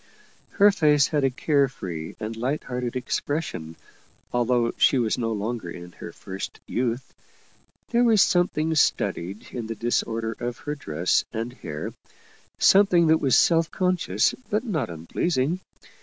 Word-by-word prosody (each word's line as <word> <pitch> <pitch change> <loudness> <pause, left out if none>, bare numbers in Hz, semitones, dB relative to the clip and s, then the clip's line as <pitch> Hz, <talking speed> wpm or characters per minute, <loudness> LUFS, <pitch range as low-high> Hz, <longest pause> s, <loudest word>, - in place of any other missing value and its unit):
Her 205 0 +6
face 150 -6 +3
had 150 -3 0
a 135 - +4
care 140 +2 +2
free 85 -11 -7
and 110 +1 -4
light 130 +6 -2
hearted 125 -1 -4
expression, 125 - -3 0.6
although 120 -1 +2
she 135 - +4
was 115 -3 +1
no 115 -1 -1
longer 110 -2 -3
in 85 0 -9
Jier - - -9
first 95 +1 -7
youth. 120 +1 -2 0.8
There 240 +1 +3
was 225 -4 +5
something 165 -3 +1
studied 100 - 0
in 120 -3 -5
the 115 - -4
dis 120 +2 +1
order 115 0 -3
of 120 0 -4
her 150 - -1
dress 85 - 0
and 115 +2 -4
hair, 75 -11 -6 0.6
something 190 -4 +5
that 160 0 +4
was 135 -3 +4
self 165 -1 +4
con 185 -1 +1
scious 105 - +1 0.2
but 210 +2 0
not 160 - -2
unpleasing. 130 - -1
125 Hz, 155 wpm, -25 LUFS, 110-160 Hz, 0.8 s, Her